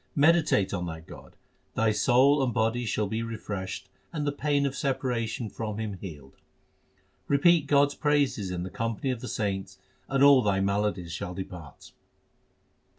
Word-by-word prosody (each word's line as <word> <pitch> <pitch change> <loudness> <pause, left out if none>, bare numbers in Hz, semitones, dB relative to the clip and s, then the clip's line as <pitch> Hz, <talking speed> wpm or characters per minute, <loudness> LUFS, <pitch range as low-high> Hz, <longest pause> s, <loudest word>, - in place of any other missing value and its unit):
Meditate 150 - +3
on 90 -2 -2
that 80 -1 -7
God; - - -13 0.4
thy 110 -1 +3
soul 135 +6 +4
and 125 - 0
body 115 +2 0
shall 105 +1 0
be 110 +3 -2
re 115 -1 -4
freshed, 100 -3 -5 0.2
and 150 -3 -3
the 145 - +1
pain 145 0 0
of 135 -1 -2
separation 125 -4 -2
from 110 -1 -5
Him 105 -4 -4
healed. 75 -8 -10 0.9
Repeat 145 +2 +4
God 145 0 +4
s - - -7
praises 145 -9 +1
in 90 -1 -3
the 95 - -6
company 115 +5 -2
of 120 -3 -4
the 125 - -6
saints, 95 -4 -3 0.3
and 135 0 +2
all 140 -2 +8
thy 100 -4 +1
maladies 100 -3 -1
shall 90 +2 -5
depart. 90 -6 -9
115 Hz, 165 wpm, -27 LUFS, 95-140 Hz, 0.9 s, all